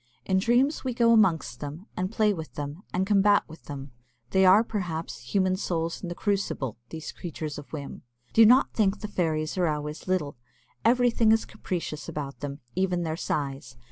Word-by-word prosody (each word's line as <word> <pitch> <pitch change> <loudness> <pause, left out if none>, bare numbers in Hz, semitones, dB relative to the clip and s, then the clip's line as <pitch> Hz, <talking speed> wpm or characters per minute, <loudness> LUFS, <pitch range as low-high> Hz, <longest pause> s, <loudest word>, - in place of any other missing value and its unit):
In 190 -1 +2
dreams 245 +8 +2
we 255 -3 -2
go 235 -1 +4
amongst 160 - +3
them, 150 +6 -7
and 185 +2 -2
play 215 -2 +3
with 160 -4 -7
them, 145 +4 -5
and 185 +1 0
combat 205 0 +4
with 160 +1 -13
them. 140 -1 -7 0.4
They 190 0 +5
are, 200 +4 +7
perhaps, 170 - -4 0.2
human 185 -1 +3
souls 165 -3 -2
in 180 - -5
the 175 - -5
crucible 190 - -2
these 160 -1 -6
creatures 155 -4 -6
of 145 - -13
whim. 145 -3 -6 0.3
Do 225 - +7
not 250 +5 +6
think 205 -2 +1
the 210 - -3
fairies 160 -3 -1
are 175 - +3
always 150 +1 -4
little. 160 -8 -1 0.5
Everything 235 -1 +4
is 225 0 +3
capricious 175 -7 -5
about 140 -2 -5
them, 145 0 -6
even 180 -1 +1
their 160 -1 -2
size. 135 -5 -3
180 Hz, 180 wpm, -27 LUFS, 150-205 Hz, 0.5 s, are